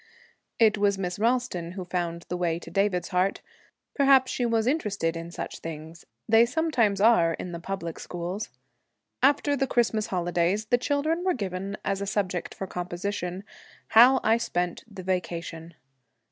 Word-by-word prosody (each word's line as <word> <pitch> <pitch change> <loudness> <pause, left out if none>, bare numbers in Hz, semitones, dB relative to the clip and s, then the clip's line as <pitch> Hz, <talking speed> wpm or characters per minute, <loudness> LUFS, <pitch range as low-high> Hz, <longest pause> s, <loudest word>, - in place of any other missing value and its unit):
It 220 -2 +4
was 200 -1 +2
Miss 180 0 -3
Ralston 225 -7 0
who 185 -1 -6
found 170 -1 -3
the 180 - -3
way 175 -2 0
to 170 - -10
David's 195 -3 0
heart. 185 +1 0 0.5
Perhaps 270 -2 +4
she 245 - 0
was 225 -1 +1
interested 210 - 0
in 165 0 -6
such 170 - -6
things; 160 +1 -9 0.2
they 225 +1 +6
sometimes 240 -6 +1
are, 185 -7 +4
in 180 - -6
the 170 - -5
public 170 -2 -5
schools. 180 +4 -5 0.7
After 285 +1 +3
the 270 -1 0
Christmas 225 -3 +1
holidays, 175 +3 0
the 245 +3 +2
children 295 +6 0
were 370 -1 +1
given 195 -2 -4
as 195 0 -1
a 200 - -3
subject 185 -3 -2
for 195 - -4
composition, 180 +1 -4 0.5
'How 250 +4 +7
I 225 +1 +4
spent 180 -7 -2
the 190 -3 -9
Vacation.' 170 -3 -4
195 Hz, 160 wpm, -26 LUFS, 175-230 Hz, 0.7 s, How